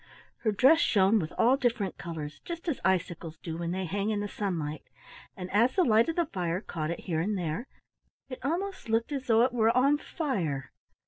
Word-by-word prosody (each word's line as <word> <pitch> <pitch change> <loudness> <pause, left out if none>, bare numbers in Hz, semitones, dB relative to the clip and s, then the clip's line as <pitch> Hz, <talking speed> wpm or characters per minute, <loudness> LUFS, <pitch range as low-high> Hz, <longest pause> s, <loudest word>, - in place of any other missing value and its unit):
Her 220 - +1
dress 265 +10 +5
shone 205 - +4
with 160 -2 -4
all 250 +4 +4
different 230 -7 -1
colors, 155 -3 -6
just 340 0 -7
as 305 -7 -1
icicles 175 -3 -1
do 160 0 -6
when 170 0 -3
they 185 +2 -2
hang 200 +4 -1
in 210 -2 0
the 205 - -2
sunlight, 165 -8 -3 0.6
and 180 -1 -5
as 230 +5 +3
the 370 - +4
light 225 -2 +4
of 325 - -2
the 345 - +2
fire 175 - -2
caught 160 -5 -4
it 170 - -4
here 165 -4 -2
and 205 +4 -1
there, 180 - -3 0.6
it 255 -2 -7
almost 360 - -3
looked 225 +4 +1
as 270 -2 -4
though 225 0 +5
it 250 0 +1
were 225 -2 +3
on 280 +3 +4
fire. 180 - -3
210 Hz, 205 wpm, -29 LUFS, 170-255 Hz, 0.6 s, dress